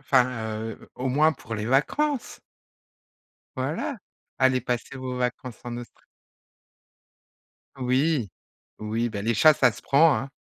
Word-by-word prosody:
enfin, 130 -2 +3 0.4
heu, - - -14
au 130 - -3
moins 150 +5 +4
pour 115 -7 -8
les 105 0 -3
vacances. 260 - 0 1.2
Voilà, 150 - -2 0.4
allez 130 -1 +4
passer 125 +2 -3
vos 130 -1 -5
vacances 125 -1 -3
en 120 0 -5
Austr 120 - -11 1.8
Oui. 130 -1 +1 0.5
Oui, 110 +2 -1
bah, 100 -3 -5
les 115 +2 +1
chats 155 +8 +7
ça 135 -5 +4
se - - -12
prend, 150 +2 +5
hein. 135 +5 -4
130 Hz, 130 wpm, -26 LUFS, 120-140 Hz, 1.8 s, chats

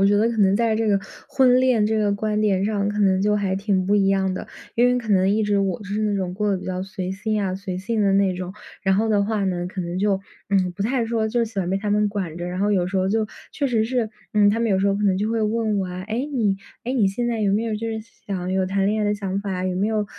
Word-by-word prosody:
我 195 - +5
觉 205 0 +4
得 220 +3 +3
可 230 - -4
能 195 -1 +4
在 225 0 +2
这 225 0 0
个， 205 -1 +3 0.3
婚 255 -1 +4
恋 250 -5 +3
这 220 +1 +1
个 205 -1 +2
观 210 +1 -1
点 195 -2 +2
上 205 -1 0
可 210 0 -2
能 190 -2 +3
就 210 +1 +2
还 195 -2 0
挺 195 -2 0
不 205 +2 +2
一 195 -1 +3
样 190 -1 +2
的。 - - -5 0.3
因 240 +1 +5
为 250 0 +3
可 235 -3 -4
能 190 -1 +3
一 215 +2 +2
直 205 -1 +1
我 195 0 -1
是 205 +1 -3
那 210 -1 +1
种 185 -2 -2
过 210 +1 -1
得 - - +1
比 - - -8
较 185 0 -3
随 190 -1 -5
心 210 +1 -1
啊、 185 - -1
随 190 -2 -5
性 220 +3 -2
的 200 -1 +3
那 195 -1 +3
种。 185 0 -5 0.3
然 190 0 +3
后 220 +3 +1
的 205 -2 +3
话 215 -1 -1
呢， 180 -2 -1
可 185 +1 -5
能 175 +1 -3
就， 195 -1 +1 0.3
嗯， 185 -2 +2
不 195 +3 -4
太 245 0 +1
说 225 -1 0
就 235 +1 +1
喜 215 -3 -7
欢 180 -2 -1
被 190 - +1
他 205 +1 -2
们 210 0 +2
管 185 -6 -4
着， 175 - -4
然 180 +1 -4
后 205 +1 +2
有 180 -3 +2
时 190 +1 -3
候 190 0 +1
就 215 +1 +1 0.2
确 285 -2 -1
实 225 -4 +1
是， 235 -2 0 0.3
嗯， 205 -1 +5
他 225 +3 +1
们 230 -2 +1
有 190 - +3
时 195 - +2
候 200 - +2
可 205 - -2
能 190 -2 +2
就 210 - 0
会 225 -1 0
问 215 -1 0
我 185 - -2
啊： 180 +1 -6
“哎， 220 - -3 0.2
你 210 -7 +1 0.3
哎， 250 - -2
你 215 -7 +3
现 240 +5 -2
在 230 -2 -1
有 200 -2 +2
没 220 +3 +1
有 220 -2 -1
就 225 +2 -3
是 220 0 -3 0.3
想 195 -3 -3
要 180 - -4
有 190 0 +1
谈 195 +1 0
恋 215 +1 +1
爱 - - +1
的 205 - +2
想 195 -1 -2
法 200 - -5
啊？ 185 0 -2
有 185 -1 -1
没 200 +4 0
有 215 -1 0
205 Hz, 335 characters per minute, -23 LUFS, 190-220 Hz, 0.3 s, 我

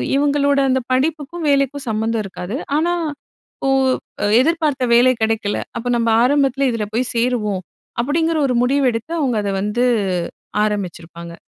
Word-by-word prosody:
இவுங்களோட 285 0 +2
அந்த 260 0 +2
படிப்புக்கும், 305 +4 -1
வேலைக்கும் 275 0 +1
சம்மந்தம் 220 0 -1
இருக்காது. 190 +3 -6 0.2
ஆனா, 345 +3 +1 0.6
"இப்போ 270 - -1 0.7
எதிர்பார்த்த 305 -4 +1
வேலை 255 +2 +6
கிடைக்கல. 220 -2 0 0.2
அப்ப 235 - -6
நம்ப 230 -1 +1
ஆரம்பத்தில 275 0 +2
இதில 220 -2 -2
போய் 250 +1 0
சேருவோம்" 225 -5 0 0.4
அப்படிங்கிற 320 +5 0
ஒரு 250 - 0
முடிவு 275 +2 +2
எடுத்து 230 +9 -5
அவுங்க 250 -6 0
அத 200 - -1
வந்து 220 +5 0 0.8
ஆரம்பிச்சிருப்பாங்க. 170 -4 -5
255 Hz, 130 wpm, -19 LUFS, 220-285 Hz, 0.8 s, வேலை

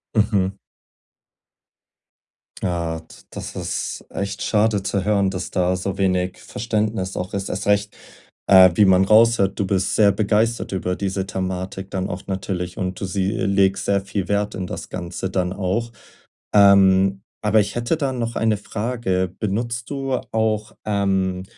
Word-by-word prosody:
Mhm. 100 -3 +1 2.1
Hart. 85 -3 -4
Das - - -6
ist - - -4
echt 100 0 -4
schade 105 -1 +2
zu 100 -1 -1
hören, 100 -2 +2
dass 90 -2 -5
da 90 0 +1
so 95 +1 -3
wenig 90 -2 0
Verständnis 105 -3 -2
auch 90 +1 -4
ist. 100 -1 -3
Erst 95 - -4
recht, 105 0 +1 0.5
äh, 95 -1 +8
wie 105 - +5
man 95 0 +5
raushört: 110 -2 +4
Du 100 - +1
bist 95 -1 0
sehr 105 -2 +5
begeistert 110 +3 0
über 90 -1 -2
diese 95 0 -2
Thematik 95 +1 -4
dann 95 -1 -2
auch 90 - -6
natürlich. 95 -2 -4
Und 90 -2 -3
du - - -3
sie 95 +1 -1
legst 100 -3 +1
sehr 100 -1 +2
viel 95 -1 -4
Wert 100 0 0
in 95 -1 -4
das - - -7
Ganze 90 +1 -5
dann 90 -1 -1
auch. 100 +5 -2 0.6
Ähm, 95 -1 +5 0.2
aber 105 +1 +4
ich 100 -1 -1
hätte 120 +6 0
da 140 -4 -1
noch 115 -2 -3
eine 110 -2 +1
Frage. 100 -4 -2
Benutzt 115 +3 -2
du 135 -2 -3 0.2
auch, 110 -1 0
ähm 95 -3 0
100 Hz, 155 wpm, -21 LUFS, 95-105 Hz, 2.1 s, äh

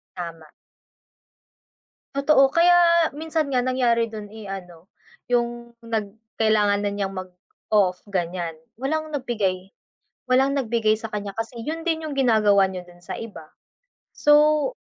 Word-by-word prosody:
Tama. 165 -3 -7 1.7
Totoo, 275 -1 +4
kaya 340 -1 +5
minsan 315 -1 -2
nga 250 -2 +1
nangyari 245 -3 +2
dun 210 -2 -8
eh 215 -1 -10
ano, 180 -4 -8 0.5
yung 240 0 -1
nag 220 -3 -3 0.2
kailangan 210 -2 +2
na 205 - 0
niyang 195 -1 -3
mag-off, 185 +1 -2
ganiyan, 175 -3 -3 0.2
walang 310 +5 -2
nagbigay. 210 -10 -2 0.6
Walang 265 +2 +3
nagbigay 230 -5 +1
sa 225 - -6
kanya 205 -2 -4
kasi 225 +1 -5
yun 320 +2 -4
din 320 -1 0
yung 290 - -5
ginagawa 215 -7 +4
niya 185 -1 -6
dun 175 0 -17
sa - - -6
iba. 205 -9 -9 0.7
So 300 +7 +4
225 Hz, 130 wpm, -23 LUFS, 195-275 Hz, 1.7 s, kaya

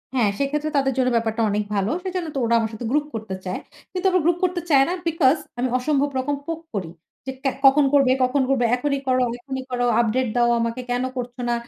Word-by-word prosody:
হ্যাঁ 230 -5 +3
সেক্ষেত্রে 295 +2 -1
তাদের 270 -1 +2
জন্য 255 -1 +3
ব্যাপারটা 225 0 0
অনেক 210 +1 0
ভালো। 200 +2 0
সেজন্য 365 -2 -3
তো 270 - 0
ওরা 235 +1 +2
আমার 225 0 -2
সাথে 220 +2 -6
গ্রুপ 295 +1 +2
করতে 215 -3 -5
চায়। 185 - -3 0.3
কিন্তু 370 +1 -4
আবার 365 -2 +3
গ্রুপ 345 0 +3
করতে 360 -1 +1
চায় 275 -3 +6
না - - 0
বিকস 310 -3 +3 0.2
আমি 255 - +1
অসম্ভব 285 +2 +1
রকম 285 +3 -1
পোক 330 +1 -4
করি। 190 -6 -3 0.4
যে 265 - -3
ক্যা 270 - +2
কখন 275 +2 +6
করবে 275 -3 +5
কখন 255 +2 +2
করবে 260 -3 +2
এখনই 280 +2 -1
করো 255 0 +3 0.2
এখনই 265 +1 -5
করো 245 0 0
আপডেট 240 +2 +1
দাও 240 0 +3
আমাকে 230 +2 -2
কেন 245 +1 0
করছ 245 -1 -4
না? - - +2
260 Hz, 220 wpm, -23 LUFS, 240-290 Hz, 0.4 s, চায়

